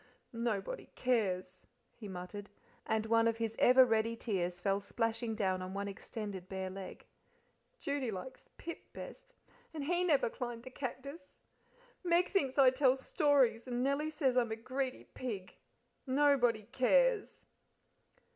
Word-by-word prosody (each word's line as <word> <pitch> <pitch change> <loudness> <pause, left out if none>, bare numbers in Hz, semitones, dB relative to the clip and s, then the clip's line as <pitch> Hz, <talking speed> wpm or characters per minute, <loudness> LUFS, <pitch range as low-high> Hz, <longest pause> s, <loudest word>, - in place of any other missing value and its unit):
"Nobody 230 - -2
cares!" 185 -7 -1 0.3
he 215 - -9
muttered, 190 +2 -7 0.4
and 220 0 +1
one 230 0 +4
of 230 0 +1
his 225 -1 -2
ever 255 +1 +7
ready 225 -1 +1
tears 180 -6 -2
fell 195 +2 +1
splashing 225 +2 -1
down 190 -4 0
on 185 +1 -6
one 200 0 -2
extended 200 -1 -6
bare 190 -1 -4
leg. 190 -1 -8 0.7
"Judy 280 - -2
likes 215 +6 -7
Pip 335 - -6
best, - - -10 0.4
and 300 - -3
he 350 +4 +1
never 310 -6 +3
climbed 235 0 -5
the 255 - -9
cactus; 280 +3 -7 0.6
Meg 350 0 +3
thinks 275 -10 0
I 265 -2 +7
tell 260 0 +3
stories; 265 -4 +2
and 245 0 -1
Nellie 280 +3 +1
says 275 -5 +1
I'm 235 -3 +2
a - - 0
greedy 255 +3 -3
pig 210 -8 -6 0.5
nobody 260 -5 +3
cares!" 420 - +2
240 Hz, 140 wpm, -34 LUFS, 205-275 Hz, 0.7 s, ever